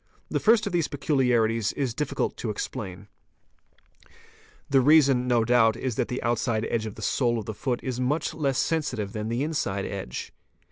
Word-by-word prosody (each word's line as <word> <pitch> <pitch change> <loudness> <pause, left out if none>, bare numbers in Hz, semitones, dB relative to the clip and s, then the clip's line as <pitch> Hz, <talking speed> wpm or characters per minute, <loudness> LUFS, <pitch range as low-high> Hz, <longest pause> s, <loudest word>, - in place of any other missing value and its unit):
The - - 0
first 225 0 +4
of 200 - -3
these 170 -3 +1
peculiarities 120 -7 +1
is 130 -5 -2
difficult 150 +3 -2
to 115 - -4
explain: 105 -2 -5 1.6
The 135 -1 +4
reason 135 -3 +5
no 120 -2 +3
doubt 115 -2 +4
is 130 -1 -2
that 120 +2 -1
the 125 - -4
outside 115 -1 0
edge 110 -2 -1
of 105 - -8
the - - -8
sole 120 -3 +1
of 110 - -4
the 110 - -4
foot 125 +3 -2
is 125 -2 -3
much 140 +6 0
less 140 -4 -1
sensitive 130 -10 -1
than 110 0 -3
the 120 +4 -1
inside 100 -11 -2
edge. 95 -11 -6
125 Hz, 180 wpm, -26 LUFS, 110-140 Hz, 1.6 s, reason